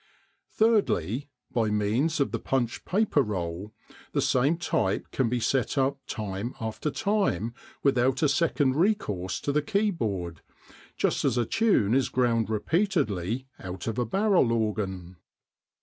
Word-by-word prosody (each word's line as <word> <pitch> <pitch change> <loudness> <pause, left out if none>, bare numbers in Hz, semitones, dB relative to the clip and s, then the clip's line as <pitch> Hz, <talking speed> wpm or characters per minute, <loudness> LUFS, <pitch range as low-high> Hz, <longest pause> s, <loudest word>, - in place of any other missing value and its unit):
Thirdly, 145 - +1 0.2
by 115 -3 +1
means 110 +10 +1
of 140 - +1
the - - -2
punched 125 -3 -1
paper 195 -6 +2
roll, 95 -3 -3 0.4
the - - +1
same 140 +6 +2
type 100 - -1
can 130 -4 +1
be 125 +1 0
set 125 +3 0
up 135 +1 +1
time 105 +2 -4
after 110 +6 -3
time 200 - 0 0.3
without 130 0 +2
a - - +5
second 145 -2 +1
recourse 105 - 0
to 145 - -1
the 150 +1 +2
keyboard, 115 - -1 0.6
just - - +1
as 130 -3 +1
a 120 - +2
tune 195 - +2
is 135 0 +2
ground 115 -4 +1
repeatedly 125 - 0
out 90 0 -7
of 115 +1 -2
a 120 - +1
barrel 195 - +3
organ. 100 -5 -2
125 Hz, 140 wpm, -27 LUFS, 105-150 Hz, 0.6 s, a